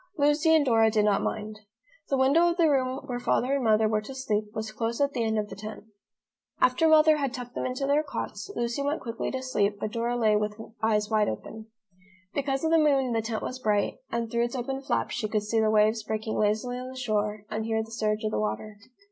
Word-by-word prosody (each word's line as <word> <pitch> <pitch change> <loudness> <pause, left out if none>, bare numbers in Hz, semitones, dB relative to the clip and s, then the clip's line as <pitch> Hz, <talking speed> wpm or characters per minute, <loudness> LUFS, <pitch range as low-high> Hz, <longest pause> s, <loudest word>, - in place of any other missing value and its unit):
Lucy 295 +2 +4
and 305 -2 +4
Dora 225 -3 +4
did 215 -1 +2
not 205 -2 +2
mind. 215 0 -4 0.5
The 275 - +1
window 285 +7 +4
of 340 - -2
the 335 -2 +4
room 260 -1 0
where 245 -3 -4
Father 250 +2 +1
and 280 -2 0
Mother 220 -1 +4
were 215 0 0
to 265 +5 -9
sleep 215 -5 -1
was 220 0 -5
close 230 +1 -3
at 280 0 +2
the 240 - -1
end 220 -1 0
of 210 -1 -1
the - - -9
tent. 215 +1 -8 0.8
After 255 +6 +3
Mother 310 0 +6
had 275 -3 -2
tucked 245 -1 -7
them - - -2
into 255 +2 -2
their 285 +2 +3
cots, 310 +6 -6
Lucy 235 +3 -1
went 285 +3 -1
quickly 230 -1 -4
to 260 0 -4
sleep 205 -6 +1
but 215 - -3
Dora 235 +1 -1
lay 215 -3 +3
with 210 +1 -1 0.2
eyes 215 -1 +1
wide 215 -1 +3
open. 220 - -7 0.7
Because 270 0 -1
of 320 - +1
the 330 - +5
moon 275 -5 +3
the 225 - +1
tent 220 0 -4
was 255 - -5
bright, 210 -1 0
and 230 -1 -2
through 235 0 +1
its 240 - -5
open 265 +2 -3
flaps - - -1
she 220 - -2
could 215 -1 -1
see 225 +2 0
the 220 -1 +3
waves 215 +1 +3
breaking 220 0 -3
lazily 215 +4 0
on 255 0 -6
the 260 - -10
shore, 215 -4 -1
and 220 0 -2
hear 220 0 0
the 225 - -13
surge 215 -2 -1
of 215 - -1
the - - -1
water. 110 - -3
230 Hz, 240 wpm, -27 LUFS, 215-265 Hz, 0.8 s, Mother